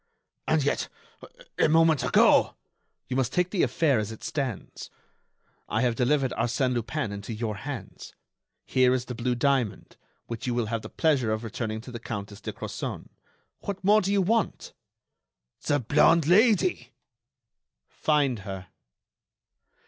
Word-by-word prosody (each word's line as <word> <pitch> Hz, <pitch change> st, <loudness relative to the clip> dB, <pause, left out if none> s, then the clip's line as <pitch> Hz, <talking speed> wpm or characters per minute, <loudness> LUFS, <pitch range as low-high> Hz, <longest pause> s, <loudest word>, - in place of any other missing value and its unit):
"And -, -, +2 dB
yet, -, -, -1 dB, 0.7 s
a -, -, +4 dB
moment 160 Hz, -2 st, +4 dB
ago——" -, -, +4 dB, 0.5 s
"You 125 Hz, -, -3 dB
must 130 Hz, -3 st, 0 dB
take 180 Hz, 0 st, 0 dB
the 195 Hz, -, 0 dB
affair 145 Hz, -8 st, +2 dB
as 105 Hz, 0 st, -3 dB
it 110 Hz, -, -10 dB
stands. 135 Hz, -9 st, -4 dB, 0.8 s
I 110 Hz, -, 0 dB
have 120 Hz, -2 st, +2 dB
delivered 130 Hz, +2 st, +1 dB
Arsène 125 Hz, +2 st, 0 dB
Lupin 115 Hz, -2 st, -2 dB
into 100 Hz, +3 st, -6 dB
your 110 Hz, -2 st, -3 dB
hands. 135 Hz, +2 st, -8 dB, 0.5 s
Here 130 Hz, -1 st, +3 dB
is 125 Hz, -1 st, -3 dB
the 125 Hz, -, -6 dB
blue 125 Hz, +1 st, -1 dB
diamond, 130 Hz, -4 st, -1 dB, 0.3 s
which 115 Hz, +1 st, -6 dB
you 120 Hz, -, 0 dB
will 120 Hz, -2 st, 0 dB
have 115 Hz, +1 st, -3 dB
the -, -, -9 dB
pleasure 140 Hz, -9 st, +1 dB
of 110 Hz, +1 st, -2 dB
returning 110 Hz, 0 st, -4 dB
to 125 Hz, -, -10 dB
the 120 Hz, -, -6 dB
Countess 105 Hz, -2 st, -6 dB
de -, -, -4 dB
Crozon. -, -, -6 dB, 0.5 s
What 200 Hz, -1 st, -5 dB
more 210 Hz, +3 st, +5 dB
do 190 Hz, -, -1 dB
you 200 Hz, -1 st, +3 dB
want?" 225 Hz, +3 st, -1 dB, 0.9 s
"The 145 Hz, -, +3 dB
blonde 150 Hz, +5 st, +4 dB
Lady." 215 Hz, -, +3 dB, 0.9 s
"Find 145 Hz, -6 st, +1 dB
her." 95 Hz, -3 st, -8 dB
125 Hz, 150 wpm, -27 LUFS, 115-150 Hz, 0.9 s, more